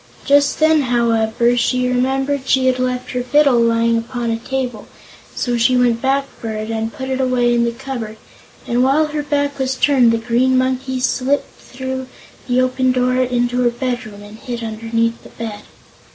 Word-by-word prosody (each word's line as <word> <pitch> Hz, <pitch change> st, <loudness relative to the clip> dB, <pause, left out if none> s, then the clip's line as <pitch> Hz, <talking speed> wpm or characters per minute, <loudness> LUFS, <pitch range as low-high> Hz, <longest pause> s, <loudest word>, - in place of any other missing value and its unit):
Just 285 Hz, 0 st, +3 dB
then, 315 Hz, -1 st, +4 dB
however, 235 Hz, -1 st, +1 dB
she 250 Hz, +1 st, +1 dB
remembered 265 Hz, +2 st, 0 dB
she 260 Hz, -1 st, +3 dB
had 255 Hz, 0 st, +2 dB
left 255 Hz, 0 st, -2 dB
her 250 Hz, -, -2 dB
fiddle 275 Hz, 0 st, +3 dB
lying 230 Hz, 0 st, +2 dB
upon 235 Hz, 0 st, -3 dB
a 225 Hz, -, -2 dB
table, 250 Hz, -3 st, -4 dB, 0.5 s
so 245 Hz, -1 st, -1 dB
she 250 Hz, +2 st, +3 dB
went 240 Hz, -2 st, +2 dB
back 275 Hz, +2 st, +1 dB
for 225 Hz, -, -5 dB
it 215 Hz, 0 st, -4 dB
and 225 Hz, 0 st, -2 dB
put 260 Hz, +2 st, -7 dB
it 265 Hz, 0 st, -1 dB
away 250 Hz, -2 st, +2 dB
in 235 Hz, 0 st, +2 dB
the 235 Hz, -, 0 dB
cupboard, 235 Hz, -3 st, -6 dB, 0.5 s
and 240 Hz, +1 st, 0 dB
while 280 Hz, +4 st, +3 dB
her 300 Hz, 0 st, -2 dB
back 285 Hz, -1 st, -1 dB
was 265 Hz, 0 st, -1 dB
turned 255 Hz, -3 st, +4 dB
the 230 Hz, -, +1 dB
Green 245 Hz, +3 st, +1 dB
Monkey 260 Hz, 0 st, -1 dB
slipped 265 Hz, +2 st, 0 dB
through 260 Hz, 0 st, -6 dB, 0.4 s
the 250 Hz, 0 st, +2 dB
open 255 Hz, 0 st, +1 dB
door 255 Hz, 0 st, +1 dB
into 245 Hz, -1 st, 0 dB
her 245 Hz, -, +3 dB
bedroom 240 Hz, -4 st, -5 dB
and 210 Hz, +2 st, -12 dB
hid 240 Hz, -2 st, -6 dB
underneath 230 Hz, +1 st, -2 dB
the -, -, -14 dB
bed. 220 Hz, -3 st, -7 dB
250 Hz, 180 wpm, -18 LUFS, 235-260 Hz, 0.5 s, then